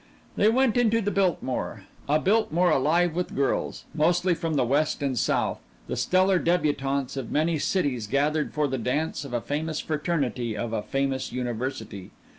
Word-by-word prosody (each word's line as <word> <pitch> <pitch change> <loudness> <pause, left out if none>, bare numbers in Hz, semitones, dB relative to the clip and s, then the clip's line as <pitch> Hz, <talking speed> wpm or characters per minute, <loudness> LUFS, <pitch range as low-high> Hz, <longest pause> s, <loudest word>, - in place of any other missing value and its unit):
They 210 - +4
went 250 0 +2
into 230 -2 +3
the 205 -2 -1
Biltmore 145 - -1 0.3
a 150 +1 +4
Biltmore 180 -4 +2
alive 160 +5 +2
with 180 +2 -3
girls 140 0 -1
mostly 175 +3 +2
from 165 -2 -2
the 135 - +3
West 145 +3 +1
and 135 -2 0
South, - - 0 0.3
the - - -4
stellar 185 0 +3
débutantes 140 -6 0
of 130 -4 -4
many 155 +1 +1
cities 140 - 0
gathered 150 +5 +1
for 150 -1 0
the 130 -1 -2
dance 145 +6 -1
of 140 - -8
a 120 -1 -1
famous 155 +3 -3
fraternity 140 -8 -2
of 115 +1 -3
a 110 - 0
famous 135 +2 -2
university. 120 -5 -4
150 Hz, 165 wpm, -26 LUFS, 130-175 Hz, 0.3 s, They